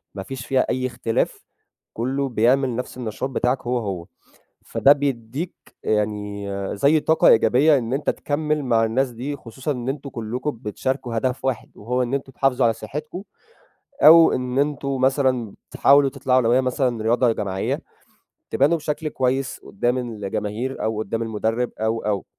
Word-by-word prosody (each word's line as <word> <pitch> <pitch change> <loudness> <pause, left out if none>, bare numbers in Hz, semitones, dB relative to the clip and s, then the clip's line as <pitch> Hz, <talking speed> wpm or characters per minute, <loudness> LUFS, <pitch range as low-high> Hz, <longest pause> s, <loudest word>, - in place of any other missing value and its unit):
ما 95 - -5
فيش 130 +1 -7
فيها 130 -1 +2
أي 130 0 0
اختلاف 115 -2 -2 0.5
كُلّه 135 +4 -1
بيعمل 125 +2 +2
نَفْس 125 +1 -5
النشاط 125 +2 -4
بتاعك 125 0 0
هو، 125 +1 +1
هو. 95 -6 -4 0.6
فده 140 - +5
بيدّيك 140 +2 -3 0.3
يعني 105 -1 -1 0.3
زي 145 +8 +4
طاقة 160 +2 +3
إيجابية 130 +7 +5
إن 115 -1 -4
أنت 140 +3 0
تكمِّل 150 +1 -1
مع 115 -3 +3
الناس 125 +4 0
دي 130 +5 -5
خصوصًا 130 +3 -5
إن 125 -2 -5
أنتم 140 +1 -4
كُلّكم 125 +4 -3
بتشاركوا 125 +2 -3
هدف 130 +2 -2
واحد 130 -3 -2
وهو 125 +4 -1
إن 125 +2 -2
أنتم 135 -1 -4
تحافظوا 135 -1 +1
على 115 - +3
صحّتكم 150 - -7 0.8
أو 165 +1 +9
إن 125 +1 -1
أنتم 140 -1 -1
مثلًا 130 -5 +1 0.2
تحاولوا 140 0 +5
تطلعوا، 130 -1 +1
لو 115 -1 +2
هي 130 +2 +4
مثلًا 125 -2 0
رياضة 120 +2 +3
جماعية، 100 -3 -2 0.7
تبانوا 145 +5 +3
بشكل 155 +1 -3
كويس 130 -1 -1
قُدّام 120 +1 -1
الجماهير 110 +1 -4
أو 110 -1 -1
قُدّام 110 +1 -2
المُدرِّب 115 +2 -1
أو، 110 +1 0
أو. 105 -2 0
125 Hz, 155 wpm, -22 LUFS, 115-135 Hz, 0.8 s, أو